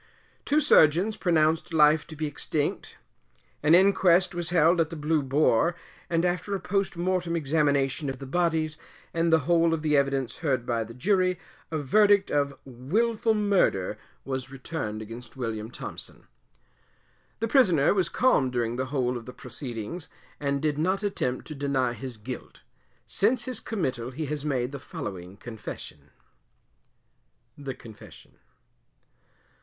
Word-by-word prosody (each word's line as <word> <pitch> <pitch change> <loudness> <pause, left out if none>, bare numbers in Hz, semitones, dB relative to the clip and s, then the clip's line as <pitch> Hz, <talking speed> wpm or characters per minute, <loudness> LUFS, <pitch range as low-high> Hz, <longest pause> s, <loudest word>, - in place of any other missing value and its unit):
Two 295 +2 +3
surgeons 180 - +5
pronounced 160 -3 +1
life 150 0 +5
to 160 - -9
be 155 +1 -3
extinct. 145 0 -2 0.6
An 150 +3 +6
inquest 185 -1 +4
was 175 -2 -2
held 170 0 +4
at 160 - 0
the 165 - -6
Blue 155 0 +1
Boar, 140 +3 +2 0.3
and 170 +1 +1
after 180 +3 -1
a - - -3
post 195 0 -1
mortem 175 -1 0
examination 145 -2 +1
of 135 - -4
the 135 - -8
bodies, 160 0 0 0.4
and 165 0 +1
the 160 -1 +5
whole 165 +2 +3
of 155 - -7
the 150 -1 +2
Evidence 140 -2 0
heard 135 -7 -1
by 115 -2 0
the 115 +1 -11
Jury, 185 +4 +2 0.3
a 160 - -2
Verdict 200 +7 +3
of 140 -1 0
Wilful 215 - 0
Murder 195 - +1 0.3
was 130 -1 -4
returned 130 -6 -5
against 115 +3 -10
William 110 -3 -4
Thompson. - - -9 1.1
The 225 - 0
Prisoner 185 - +4
was 185 -4 +1
calm 240 - +3
during 120 -1 -2
the 130 0 -2
whole 125 -3 -1
of 115 - -10
the 125 - -8
proceedings, 125 +4 -5 0.3
and 140 0 -1
did 150 -1 0
not 190 +5 0
attempt 130 -11 -2
to 155 - -7
deny 135 -4 0
his 120 0 -7
guilt. 125 +4 -8 0.4
Since 230 +4 +2
his 255 -4 -1
committal 130 - -3
he 150 +5 -5
has 150 0 -4
made 130 -4 -1
the 140 - -6
following 95 -6 -7
Confession. 100 -10 -8 1.5
THE 135 -3 -6
CONFESSION. 110 -3 -14
150 Hz, 150 wpm, -27 LUFS, 130-175 Hz, 1.5 s, An